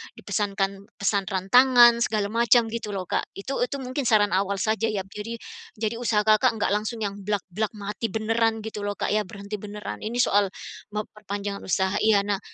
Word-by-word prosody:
dipesankan 200 Hz, -1 st, -2 dB
pesan 200 Hz, -1 st, 0 dB
rantangan, 240 Hz, +5 st, +6 dB
segala 210 Hz, -3 st, -1 dB
macam 230 Hz, 0 st, +4 dB
gitu 215 Hz, -3 st, -4 dB
loh, 190 Hz, -, -2 dB
Kak. -, -, -1 dB
Itu 260 Hz, +8 st, -4 dB
itu 250 Hz, -, -2 dB
mungkin 255 Hz, 0 st, -2 dB
saran 210 Hz, -2 st, +4 dB
awal 195 Hz, +2 st, +1 dB
saja 220 Hz, +3 st, 0 dB
ya, 205 Hz, -3 st, -2 dB
jadi 210 Hz, +4 st, -7 dB, 0.4 s
jadi 225 Hz, +1 st, -2 dB
usaha 215 Hz, -3 st, +1 dB
Kakak 220 Hz, +3 st, +4 dB
nggak 210 Hz, -2 st, 0 dB
langsung 215 Hz, +2 st, -1 dB
yang 200 Hz, 0 st, -3 dB
blak-blak 205 Hz, +1 st, -3 dB
mati 210 Hz, +2 st, -4 dB
beneran 225 Hz, 0 st, 0 dB
gitu 210 Hz, -2 st, -5 dB
loh, 205 Hz, -, -2 dB
Kak -, -, -2 dB
ya, 210 Hz, -2 st, +1 dB
berhenti 200 Hz, +1 st, -7 dB
beneran. 210 Hz, 0 st, -7 dB
Ini 220 Hz, +3 st, -5 dB
soal 205 Hz, -1 st, +3 dB, 0.5 s
memperpanjang 205 Hz, -1 st, -4 dB
usaha 190 Hz, +1 st, 0 dB
iya. 210 Hz, -2 st, +4 dB
Nah, 205 Hz, -1 st, -1 dB
210 Hz, 175 wpm, -25 LUFS, 200-225 Hz, 0.5 s, rantangan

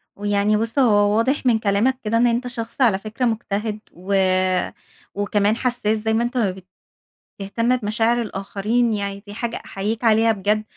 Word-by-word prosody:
ويعني 205 Hz, +1 st, +1 dB
بُص 230 Hz, +5 st, -1 dB
هو 205 Hz, -4 st, +4 dB
واضح 260 Hz, +4 st, 0 dB
من 230 Hz, -3 st, +3 dB
كلامك 220 Hz, +6 st, +1 dB
كده 220 Hz, +2 st, 0 dB
إن 240 Hz, +1 st, +4 dB
أنت 240 Hz, +2 st, 0 dB
شخص 240 Hz, +2 st, -6 dB
على 210 Hz, -6 st, +4 dB
فكرة 220 Hz, +4 st, -3 dB
مجتهد 215 Hz, -2 st, -2 dB
و 185 Hz, +3 st, -5 dB, 1.0 s
وكمان 205 Hz, +1 st, +1 dB
حساس 240 Hz, -4 st, 0 dB
زي 220 Hz, +1 st, -1 dB
ما 230 Hz, +2 st, +2 dB
أنت 245 Hz, +1 st, -3 dB
ما 205 Hz, -6 st, +2 dB, 0.9 s
بتهتم 230 Hz, +5 st, 0 dB
بمشاعر 230 Hz, +1 st, 0 dB
الآخرين 215 Hz, +3 st, -1 dB
يعني، 200 Hz, 0 st, -4 dB
دي 205 Hz, -, -8 dB
حاجة 230 Hz, +1 st, -4 dB
أحييك 215 Hz, +4 st, -4 dB
عليها 225 Hz, 0 st, +4 dB
بجد، 210 Hz, +1 st, 0 dB
220 Hz, 160 wpm, -21 LUFS, 205-235 Hz, 1.0 s, هو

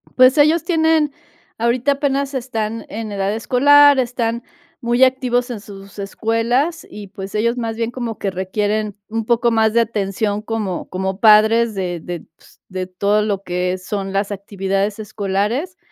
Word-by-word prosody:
Pues, 255 Hz, +2 st, +6 dB
ellos 305 Hz, +2 st, +4 dB
tienen, 320 Hz, -3 st, +2 dB, 0.4 s
ahorita 240 Hz, +4 st, +1 dB
apenas 280 Hz, 0 st, -1 dB
están 225 Hz, -4 st, -3 dB
en 220 Hz, 0 st, -5 dB
edad 200 Hz, 0 st, -1 dB
escolar, 285 Hz, +5 st, +5 dB
están 235 Hz, -2 st, -1 dB, 0.4 s
muy 240 Hz, +1 st, +2 dB
activos 250 Hz, -1 st, +1 dB
en 230 Hz, -, -5 dB
sus 200 Hz, 0 st, -12 dB
escuelas 230 Hz, +10 st, -1 dB
y, 210 Hz, -1 st, -9 dB
pues, 195 Hz, +1 st, -8 dB
ellos 235 Hz, +3 st, +1 dB
más 225 Hz, -2 st, -3 dB
bien 230 Hz, 0 st, -2 dB
como 240 Hz, -3 st, -5 dB
que 195 Hz, -, -2 dB
requieren 205 Hz, +3 st, -2 dB
un 225 Hz, 0 st, -3 dB
poco 235 Hz, +1 st, +2 dB
más 220 Hz, -1 st, +2 dB
de 235 Hz, -, +4 dB
atención 205 Hz, -1 st, -1 dB
como 215 Hz, -5 st, -4 dB
como 190 Hz, +1 st, -3 dB
padres 220 Hz, +1 st, +5 dB
de 180 Hz, -3 st, -3 dB
de, 175 Hz, 0 st, -6 dB
pues, -, -, -23 dB
de 185 Hz, -1 st, -4 dB
todo 200 Hz, +3 st, +1 dB
lo 205 Hz, -2 st, -2 dB
que 180 Hz, 0 st, -1 dB
son 195 Hz, +1 st, -4 dB
las 195 Hz, +1 st, -1 dB
actividades 195 Hz, 0 st, -2 dB
escolares. 215 Hz, -, -2 dB
220 Hz, 160 wpm, -19 LUFS, 200-245 Hz, 0.4 s, Pues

